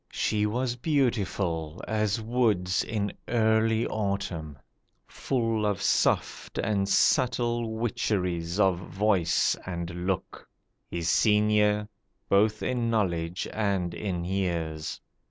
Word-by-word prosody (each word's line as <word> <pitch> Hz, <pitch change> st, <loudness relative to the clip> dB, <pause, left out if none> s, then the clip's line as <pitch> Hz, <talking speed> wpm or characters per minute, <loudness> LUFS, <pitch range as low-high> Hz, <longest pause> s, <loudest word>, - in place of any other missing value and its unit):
She 105 Hz, -1 st, 0 dB
was 120 Hz, +3 st, -1 dB
beautiful 100 Hz, -, -1 dB
As 110 Hz, 0 st, 0 dB
woods 110 Hz, -6 st, +1 dB
in 105 Hz, -2 st, -2 dB
early 110 Hz, -1 st, +2 dB
autumn. 95 Hz, -8 st, -3 dB, 0.5 s
Full 115 Hz, -4 st, -1 dB
of 105 Hz, -3 st, 0 dB
soft -, -, 0 dB
And 100 Hz, -2 st, 0 dB
subtle 120 Hz, -2 st, +2 dB
witcheries 90 Hz, -6 st, -1 dB
of 95 Hz, -3 st, +3 dB
voice 95 Hz, -3 st, +1 dB
and 85 Hz, 0 st, -5 dB
look— 95 Hz, -2 st, -3 dB, 0.4 s
His 85 Hz, -1 st, -3 dB
senior, 105 Hz, 0 st, +3 dB, 0.4 s
both 105 Hz, +2 st, +3 dB
in 120 Hz, -2 st, 0 dB
knowledge 90 Hz, -5 st, -1 dB
and 100 Hz, -5 st, 0 dB
in 90 Hz, -2 st, -3 dB
years. 85 Hz, -5 st, -2 dB
105 Hz, 100 wpm, -27 LUFS, 90-110 Hz, 0.5 s, of